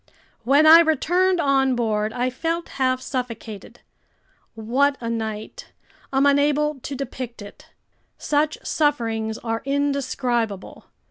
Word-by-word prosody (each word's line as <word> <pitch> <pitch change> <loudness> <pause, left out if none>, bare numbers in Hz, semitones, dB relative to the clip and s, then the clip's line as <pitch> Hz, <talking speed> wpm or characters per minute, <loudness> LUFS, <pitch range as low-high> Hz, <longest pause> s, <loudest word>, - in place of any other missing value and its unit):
When 280 +6 +4
I 320 +2 +10
returned 350 +3 +2
on 270 -3 +2
board, 215 -2 -1
I 250 +2 -1
felt 330 +6 -3
half 255 -1 +1
suffocated. 230 -6 -6 0.7
What 265 +6 +1
a 230 -1 -4
night! 220 - -6 0.4
I'm 270 +1 +2
unable 290 +1 +2
to 275 +2 -6
depict 255 -2 -6
it. 205 - -14 0.5
Such 300 +1 0
sufferings 225 -7 -1
are 225 -1 -2
indescribable. 260 -6 -2
260 Hz, 115 wpm, -22 LUFS, 230-290 Hz, 0.7 s, I